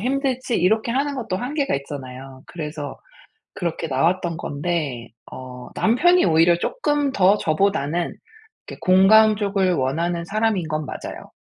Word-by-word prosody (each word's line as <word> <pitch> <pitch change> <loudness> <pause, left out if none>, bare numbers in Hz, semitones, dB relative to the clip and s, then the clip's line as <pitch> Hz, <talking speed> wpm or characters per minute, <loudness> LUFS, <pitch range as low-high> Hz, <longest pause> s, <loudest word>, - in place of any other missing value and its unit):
힘들지?" 255 0 -1
이렇게 220 +6 +1
하는 280 +1 -1
것도 220 -7 -3
한계가 275 - -1
있잖아요. 135 -1 -9
그래서 150 -3 -6 0.6
그렇게 170 -2 -3
나왔던 170 +5 0
건데 145 -7 -3 0.2
어 125 -1 -9
남편이 350 +11 +3
오히려 165 +1 +4
쪼끔 295 - 0
더 195 -1 +4
저보다는 170 -1 0 0.5
이렇게 - - -9
공감 210 +4 +6
쪽을 195 -3 0
원하는 170 +6 -1
사람인 210 -4 0
건 155 -1 -2
맞아요. - - -8
180 Hz, 310 characters per minute, -22 LUFS, 155-220 Hz, 0.6 s, 공감